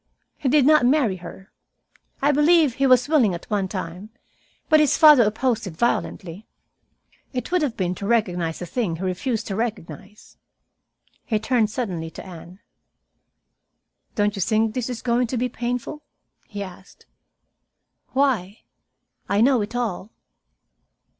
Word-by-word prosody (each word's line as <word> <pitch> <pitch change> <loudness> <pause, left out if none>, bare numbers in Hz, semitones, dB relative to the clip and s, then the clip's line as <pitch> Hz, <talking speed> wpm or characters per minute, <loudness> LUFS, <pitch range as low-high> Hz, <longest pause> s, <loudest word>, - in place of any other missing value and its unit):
He 270 - -2
did 290 0 +4
not 305 -1 +5
marry 245 -7 +2
her. 180 +2 -12 0.7
I 290 - +4
believe 300 -1 +4
he 275 +3 +1
was 255 0 +4
willing 255 - +3
at 170 - -9
one 200 -2 0
time, 185 +1 -6 0.6
but 310 -1 +5
his 300 -3 +3
father 300 -5 +8
opposed 225 +1 0
it 160 -4 -9
violently. 195 -4 -2 0.9
It 250 +6 -4
would 360 -1 +2
have 275 -6 -2
been 180 -2 -1
to 200 +2 -6
recognize 180 -8 0
a - - -4
thing 190 -2 -2
he 170 - -7
refused 205 +5 -2
to 195 - -4
recognize." 210 -2 -6 0.9
He 220 - -1
turned 220 0 +1
suddenly 185 -9 -4
to - - -11
Anne. 180 +1 -12 1.5
"Don't 205 0 +1
you 195 - -4
think 220 +2 +1
this 250 0 -3
is 245 -2 -6
going 245 0 +1
to 250 - -3
be 250 +2 -1
painful?" 245 +5 -4 0.5
he 205 -2 -6
asked. 190 0 -13 1.1
"Why? 235 -8 0 0.7
I 200 - +1
know 250 +1 +4
it 210 +4 -5
all." 220 -5 -3
225 Hz, 145 wpm, -23 LUFS, 190-255 Hz, 1.5 s, father